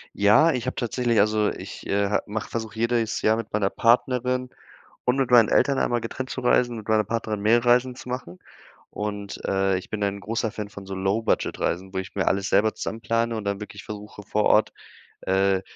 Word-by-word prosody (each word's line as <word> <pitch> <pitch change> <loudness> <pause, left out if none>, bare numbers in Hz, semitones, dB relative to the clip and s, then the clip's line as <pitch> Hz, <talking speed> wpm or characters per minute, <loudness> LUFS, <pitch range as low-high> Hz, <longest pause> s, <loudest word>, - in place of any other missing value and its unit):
Ja, 110 +11 +5
ich 125 -3 -3
habe 130 - -3
tatsächlich 120 -1 0
also, 105 0 +3
ich, - - -9
äh, 100 +1 +1
mache 105 +1 -4
versuche 110 -2 -5
jedes 115 -1 0
Jahr 110 - +3
mit 115 -1 -6
meiner 100 -2 +1
Partnerin 125 +2 +1 0.6
und 125 +1 +2
mit 135 -3 0
meinen 120 -3 +7
Eltern 140 -1 +3
einmal 120 0 +1
getrennt 130 +3 -5
zu 130 - -4
reisen, 125 -1 +2
mit 110 -1 -9
meiner 110 -1 +3
Partnerin 110 -1 -3
mehrere 115 +3 +3
Reisen 125 +1 +3
zu 125 - -11
machen. 125 -8 -5 0.5
Und, 105 -1 -5
äh, 95 0 +1
ich - - -11
bin 105 -1 -3
ein 100 0 -1
großer 110 +2 -2
Fan 105 -1 -6
von 100 -1 -10
so 95 - -5
Low-Budget-Reisen, 95 -2 -1
wo - - -1
ich 95 -2 -6
mir 95 - -1
alles 95 0 +1
selber 105 +2 +3
zusammenplane 115 0 -2
und 110 - -5
dann 100 0 -2
wirklich 105 -1 -9
versuche 105 0 -9
vor 105 +1 -1
Ort, 105 - +4 0.5
äh, 95 0 +2
110 Hz, 200 wpm, -24 LUFS, 100-120 Hz, 0.6 s, meinen